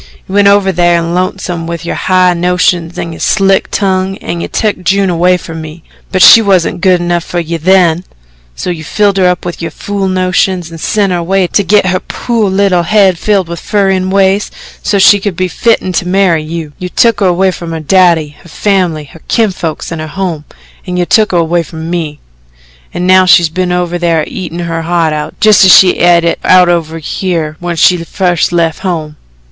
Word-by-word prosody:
"You 190 - -8
went 200 0 +3
over 200 -1 +3
thar 175 -1 +2
in 170 0 -2
Lonesome 180 -2 -3
with 170 0 -6
your - - -3
high 185 -1 +2
notions 175 -1 0
an' 165 - -5
your - - -11
slick 195 -2 +1
tongue, 190 -1 -1
an' 170 - -5
you - - -4
took 210 -4 -2
June 190 +1 +1
away 180 +2 +2
from 165 -2 -8
me. 155 +1 -10 0.3
But 185 -1 +2
she 225 - +9
wusn't 185 -4 0
good 185 -1 +3
enough 175 -1 -1
fer 175 - -6
you 170 -1 -3
THEN 175 0 +2 0.5
so 180 - -4
you 160 -2 -6
filled 200 +3 0
her 185 -1 +3
up 180 0 -1
with 175 -1 -6
yo' 165 - -3
fool 200 -1 -4
notions 185 -1 -1
an' 165 - -9
sent 200 +2 0
her 175 - -1
away 190 +2 0
to 200 +3 0
git 205 +2 +2
her 185 0 0
po' 235 +4 -4
little 190 -2 +1
head 190 -1 +2
filled 200 -4 0
with 170 0 -6
furrin' 195 -2 0
ways, 195 +1 +1 0.3
so 205 - 0
she 200 +1 +5
could 195 -2 -4
be 185 +1 -1
fitten 220 0 0
to 180 - -2
marry 180 -3 +1
you. 155 -1 -7
You 180 - -5
took 230 +3 +2
her 195 - +2
away 185 +2 +1
from 170 -2 -8
her 165 - -4
daddy, 170 -1 +2
her 170 - -16
family, 180 -4 -1
her 155 +3 -16
kinfolks 185 -10 -2
and 165 -1 -5
her 155 - -6
home, 165 -2 -4 0.4
an' 180 0 -3
you 175 - 0
took 215 +4 +2
her 180 - +1
away 170 +1 +1
from 165 0 -8
me; 160 -4 -4 0.7
an' 175 - -4
now 185 0 +4
she's 175 -2 +5
been 180 +2 -2
over 175 0 -2
thar 165 -2 0
eatin' 180 -2 -7
her 165 -1 -3
heart 165 -1 0
out 150 0 -6
just 215 -3 +5
as 190 - +6
she 185 -1 +5
et 175 -1 +4
it 170 - -1
out 180 -1 +4
over 165 -2 -1
here 165 -1 -3
when 175 -1 -4
she 175 +1 +2
fust 175 -1 -1
left 165 -2 0
home. 160 -5 -4
180 Hz, 210 wpm, -10 LUFS, 170-190 Hz, 0.7 s, she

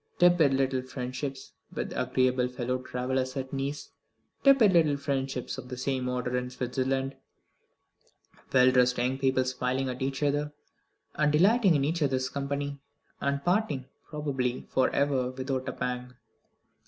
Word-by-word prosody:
Tepid 175 -6 +5
little 135 -1 +1
friendships 130 +1 -5 0.2
with - - -4
agreeable 130 -1 +1
fellow 125 0 -2
travellers 130 +1 -2
at 130 0 -4
Nice; 140 +2 -4 0.5
tepid 265 -8 +6
little 155 -4 +4
friendships 135 -2 -3
of 125 -1 -10
the 125 - -5
same 130 0 -1
order 125 0 -2
in 125 0 -1
Switzerland; 130 +2 -2 1.4
well 130 -1 +6
dressed 125 -1 +3
young 125 +2 0
people 130 -1 +2
smiling 130 +1 -1
at 125 0 -5
each 135 +2 -2
other, 145 +1 0 0.6
and 150 -1 +2
delighting 195 +4 +4
in 140 -1 +2
each 165 +3 -1
other's 130 -3 +1
company; 140 0 -3 0.4
and 140 0 -1
parting, 180 - +1 0.2
probably 135 -5 -2
for 130 -1 +3
ever, 135 -3 +1
without 130 0 -3
a - - -2
pang. 125 0 -4
130 Hz, 140 wpm, -28 LUFS, 125-140 Hz, 1.4 s, tepid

